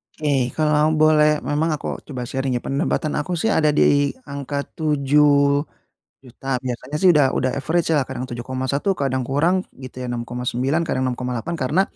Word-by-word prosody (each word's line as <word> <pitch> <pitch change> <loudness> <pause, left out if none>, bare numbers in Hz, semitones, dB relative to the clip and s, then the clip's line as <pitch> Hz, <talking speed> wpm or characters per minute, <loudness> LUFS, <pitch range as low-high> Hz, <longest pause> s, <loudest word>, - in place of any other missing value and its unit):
Oke. 140 -5 0
Kalau 155 0 +2
boleh 155 -1 +4
memang 150 +3 0
aku 145 - -5
coba 130 -4 -5
sharing 135 +1 -2
ya. 120 - -2
Penambatan 150 +2 -1
aku 175 +5 -2
sih 220 +7 0
ada 155 -5 +3
di 145 -1 +4 0.2
angka 140 0 -4
Rp7.000.000. 145 -3 0 0.2
Biasanya 130 +3 -5
sih 185 +4 +4
udah 150 -4 +4
udah, 130 0 +1
average 165 +4 0
ya 155 - +4
kadang - - -5
Rp7.100.000, 130 +8 -2
kadang 130 -4 -1
kurang 170 +7 +1
gitu 130 -1 -10
ya, 125 - -4
Rp6.900.000, 125 +5 -2
kadang 130 - -1
Rp6.800.000, 125 +3 -3
karena 150 +8 +2
140 Hz, 155 wpm, -21 LUFS, 130-155 Hz, 0.2 s, boleh